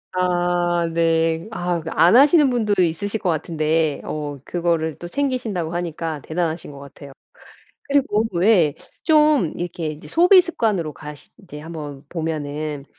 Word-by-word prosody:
아 175 -1 +1
네. 165 0 +1
아 175 -5 -2
그 160 - -6
안 170 +7 +4
하시는 290 +3 +6
분도 220 -4 0
있으실 200 +6 -2
것 185 - -1
같은데 155 -1 0
어 145 -2 -5
그거를 165 -3 -1
또 175 - -7
챙기신다고 225 - -2
하니까 165 -3 -4
대단하신 160 0 -3
것 140 - -12
같아요. 140 0 -12 0.7
그리고 275 -7 +1
왜 175 -4 +3 0.3
좀 300 - +3
이렇게 175 -2 -4
이제 150 0 -8
소비 360 +3 +6
습관으로 210 - -2
가시 150 -2 -10
이제 150 -6 -10
한번 150 -3 -8
보면은 150 -3 -4
170 Hz, 290 characters per minute, -21 LUFS, 155-205 Hz, 0.7 s, 하시는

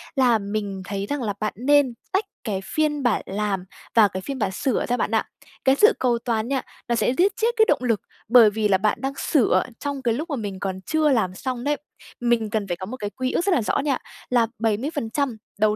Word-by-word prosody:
là 250 -4 +4
mình 200 -1 -3
thấy 200 0 -3
rằng 285 +5 -3
là 210 -3 -1
bạn 215 -1 -1
nên 265 +2 +3 0.2
tách 390 +2 +1 0.2
cái 195 -3 -2
phiên 295 +3 0
bản 240 -5 +2
làm 200 -1 -2 0.3
và 220 -3 +7
cái 185 -1 -5
phiên 270 +7 -5
bản 200 -4 0
sửa 255 +7 0
ra 245 - 0
bạn - - -1
ạ. - - +2 0.4
Cái 265 0 +5
sự 425 - +6
cầu 245 -2 +2
toàn 225 -2 0
nha, 270 0 0 0.3
nó 235 - +1
sẽ 245 - +2
giết 385 +3 +4
chết 450 - +1
cái 440 - +6
động 255 - +2
lực, 230 -4 +1 0.3
bởi 230 -1 +8
vì 215 0 0
là 195 -2 +4
bạn 210 +2 +1
đang 270 0 -2
sửa 285 -9 +3 0.2
trong 285 -2 -3
cái 235 -3 +1
lúc 305 +9 -4
mà 290 - -1
mình 205 -6 -5
còn 190 -1 -3
chưa 315 +5 +1
làm 215 -9 +1
xong 255 +2 -4
đấy. 290 +1 +1 0.4
Mình 235 -3 +1
cần 215 -2 -1
phải 175 -2 -2
có 185 - -6
một 245 +7 -6
cái 205 -4 -4
quy 255 +4 -3
ước 345 - 0
rất 400 - +2
là - - +2
rõ 210 - 0
nha, 275 -2 +1 0.3
là 240 -2 +3
70% 230 +2 -1 0.2
đầu 215 0 +3
235 Hz, 240 wpm, -23 LUFS, 210-275 Hz, 0.4 s, bởi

